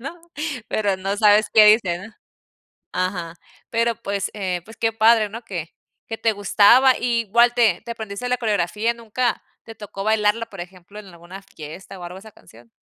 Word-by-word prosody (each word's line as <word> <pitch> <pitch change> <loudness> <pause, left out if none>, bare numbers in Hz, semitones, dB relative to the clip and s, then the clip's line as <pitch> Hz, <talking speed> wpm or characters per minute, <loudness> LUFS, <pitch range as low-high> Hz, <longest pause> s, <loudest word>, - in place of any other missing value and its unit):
¿no? 325 +7 -8 0.5
Pero, 200 -3 0
no 195 +2 -3
sabes 210 0 +4
qué 215 -1 +8
dicen. 210 -1 +2 0.8
Ajá, 180 -2 -3 0.4
pero 230 0 +1
pues, 200 0 -3
eh, 185 -4 -3
pues, 225 - -14
qué 225 -1 0
padre, 225 -1 +4
¿no? 230 +4 -8
Que 170 -6 -6 0.4
que 225 - -5
te 225 - +2
gustaba. 215 +6 +5
I 235 -1 0
igual 235 +3 +3
te 225 -7 +3
te 235 - -8
aprendiste 220 +1 -6
la 250 - +1
coreografía, 215 0 -1
¿nunca 235 +1 -2 0.2
te 225 - -11
tocó 200 -2 -8
bailarla, 220 +1 +1
por 195 -5 -11
ejemplo, 185 +3 -11
en 205 - -15
alguna 175 +2 -12
fiesta, 185 +2 -11
o, 175 - -9
algo 180 +2 -8
esa 220 +2 -13
canción? 115 +1 -19
210 Hz, 180 wpm, -21 LUFS, 190-230 Hz, 0.8 s, qué